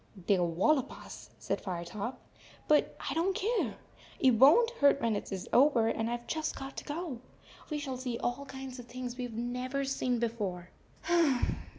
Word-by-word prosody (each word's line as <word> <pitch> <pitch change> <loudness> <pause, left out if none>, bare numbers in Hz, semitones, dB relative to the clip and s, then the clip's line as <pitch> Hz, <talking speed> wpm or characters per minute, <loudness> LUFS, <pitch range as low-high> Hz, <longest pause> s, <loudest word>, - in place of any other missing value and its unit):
" 185 -3 -14
"They - - +5
11 175 -3 +1
wallop 270 - +3
us," - - -10
said - - -2
Firetop, 195 +6 -4 0.5
"but 300 -1 +3
I - - -1
don 350 +5 +1
t - - -3 0.2
care. - - -1 0.4
It 265 - +5
won 275 - +7
t 475 - -8
hurt 280 -1 +5
when 230 -4 +1
it 205 - -5
is 190 -2 -4
over, 245 -4 +5
and 225 0 -1
I 240 - -1
Ve 240 - -17
just 315 -1 -2
got 270 0 -7
to - - -4
go. 300 -4 -4 0.5
We 305 - -1
shall 270 -3 -4
see 250 -2 -3
all 245 +5 -2
kinds 265 -1 -7
of 240 - -10
things 250 0 -5
that - - -18
we 250 - -2
Ve 230 -1 -6
never 250 +3 -2
seen 255 -2 0
before." 205 -7 -3
250 Hz, 205 wpm, -31 LUFS, 225-275 Hz, 0.5 s, won